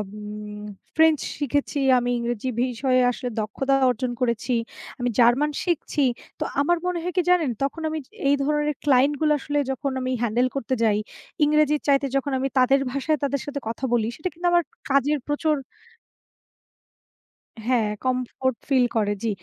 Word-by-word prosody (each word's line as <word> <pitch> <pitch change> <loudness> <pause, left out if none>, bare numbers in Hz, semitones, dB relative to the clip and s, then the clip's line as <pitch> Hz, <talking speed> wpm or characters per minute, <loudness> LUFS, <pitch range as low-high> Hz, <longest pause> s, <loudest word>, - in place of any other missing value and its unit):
উম 210 0 -8 0.3
French 320 -2 +5 0.2
শিখেছি, 285 +1 -1 0.2
আমি 245 0 0
ইংরেজি 240 +1 -2
বিষয়ে 255 +1 +1
আসলে 250 0 -5
দক্ষতা 265 +6 -1 0.2
অর্জন 250 +1 -1
করেছি। 240 +1 0 0.5
আমি 245 0 0
জার্মান 245 +6 +4
শিখছি। 325 -4 0 0.4
তো - - 0 0.2
আমার 345 +4 +2
মনে 360 -1 -1
হয় 360 -1 -3
কি - - +5
জানেন? 340 -7 +3
তখন 300 +4 -2
আমি 315 - -3
যে - - -42 0.2
এই 285 - +5
ধরনের 295 +1 +1
ক্লায়েন্ট 280 0 +4
গুলো 305 -1 +4
আসলে 290 +1 -1
যখন 275 +1 -2
আমি 255 0 -2
হ্যান্ডেল 240 +2 +2
করতে 260 -1 -2
যাই 210 -2 +3 0.5
ইংরেজির 300 0 +3
চাইতে 275 0 +3
যখন 275 +1 0
আমি 270 - 0
তাদের 270 +2 +5
ভাষায় 290 +3 0
তাদের 280 -1 0
সাথে 285 -1 -4
কথা 230 +3 -5
বলি 225 -2 +2
সেটা 360 +4 -3
কিন্তু 350 +1 -2
আমার 345 -1 +4
ক - - -83 0.2
কাজের 280 +2 +3
প্রচুর 300 +1 +1 2.1
হ্যাঁ 230 -4 +2 0.2
কমফোর্ট 255 0 -1
ফিল 260 -3 +4
করে, 205 -2 +2
জি। 225 - +1
270 Hz, 165 wpm, -24 LUFS, 245-295 Hz, 2.1 s, French